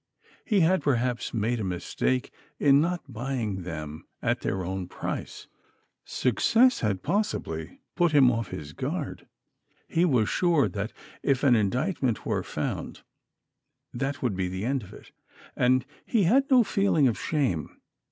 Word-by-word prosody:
He 210 -5 +3
had 185 +3 +3
perhaps 125 -2 0
made 115 +1 0
a - - -2
mistake 95 +8 -1 0.3
in 140 0 +5
not 175 +2 -1
buying 120 -5 -3
them 75 -3 -7
at - - 0
their 95 -2 -2
own 95 0 -3
price. - - -5 0.6
Success 230 - +3
had 100 -4 -1
possibly 145 - -2
put 175 -2 +3
him 135 -4 +6
off 115 -3 -2
his 75 -3 -7
guard. - - -4 0.6
He 165 - +1
was 125 -11 +3
sure 170 -3 +2
that 105 +2 -4 0.3
if 135 -1 +1
an 130 -4 +6
indictment 125 - 0
were - - 0
found, - - -4 0.9
that 135 +3 -3
would 120 -6 0
be 95 -1 -1
the 95 +3 -4
end 135 +1 0
of 100 - -12
it, - - -14 0.4
and 130 +1 +3 0.2
he 225 -5 +1
had 265 +10 +3
no 255 -3 +6
feeling 195 -9 +2
of 115 - +1
shame. 130 - -1
125 Hz, 150 wpm, -27 LUFS, 100-160 Hz, 0.9 s, him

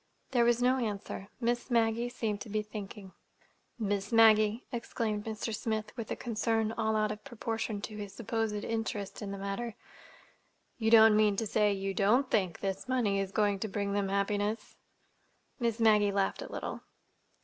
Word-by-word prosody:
There 240 -3 +4
was 240 +1 +3
no 255 +1 +3
answer. 205 -3 -4
Miss 240 +1 -1
Maggie 230 0 +2
seemed 215 -4 -3
to - - -7
be 215 +1 -1
thinking. 205 -2 -8 0.6
"Miss 205 -2 -2
Maggie," 220 0 +5
exclaimed 225 -3 -3
Mr. 220 0 -3
Smith, 215 0 -3
with 230 -2 -6
a - - -1
concern 225 -1 0
all 220 -1 0
out 215 0 +1
of 215 0 -7
proportion 225 -4 -3
to 215 - -5
his 205 -1 -6
supposed 225 +1 -2
interest 225 -3 -3
in 205 - -4
the 200 - -5
matter, 200 +4 -4 1.0
"you 220 -1 +2
don't 220 -1 +8
mean 210 -1 +4
to 225 - -1
say 210 0 +2
you 195 0 -2
don't 235 +7 +2
think 185 -5 0
this 195 +3 -3
money 220 -6 +1
is 195 -1 -2
going 205 -2 +1
to 220 - -2
bring 200 0 -2
them 200 -1 0
happiness!" 205 +2 -1 0.8
Miss 235 -2 0
Maggie 210 -2 +5
laughed 195 -1 0
a - - -7
little. - - -5
215 Hz, 170 wpm, -31 LUFS, 205-230 Hz, 1.0 s, don't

